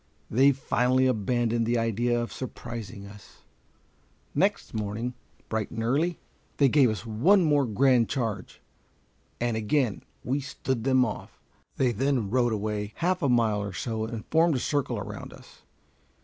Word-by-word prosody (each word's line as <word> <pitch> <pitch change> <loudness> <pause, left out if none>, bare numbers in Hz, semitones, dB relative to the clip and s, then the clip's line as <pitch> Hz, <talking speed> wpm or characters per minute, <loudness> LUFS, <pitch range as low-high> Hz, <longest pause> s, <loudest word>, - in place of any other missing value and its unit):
They 135 +5 +5
finally 130 -1 +1
abandoned 120 -1 +1
the 120 +1 +2
idea 115 +1 +1
of 120 - -4
surprising 115 -5 -7
us. 100 0 -15 0.9
Next - - 0
morning, 110 +3 -3 0.3
bright 110 -2 -2
and 115 -1 -4
early, 155 +9 +1 0.4
they 140 -2 +5
gave 135 -3 +5
us 110 +1 -4
one 160 - +4
more 145 -4 +3
grand 125 +1 +3
charge, 110 - -3 0.8
and 120 -1 0
again 110 +1 0 0.2
we 135 +3 0
"stood 130 -3 -3
them 130 -1 +4
off." 105 - -7 0.4
They 130 -2 +2
then 120 -3 0
rode 120 -1 +2
away 105 0 -3
half 180 +2 0
a 140 - +2
mile 115 -4 +2
or 100 -1 -5
so, 110 +4 -3
and 110 -1 -6
formed 160 0 +4
a - - 0
circle 145 +1 -1
around - - -7
us. - - -16
120 Hz, 150 wpm, -27 LUFS, 110-135 Hz, 0.9 s, They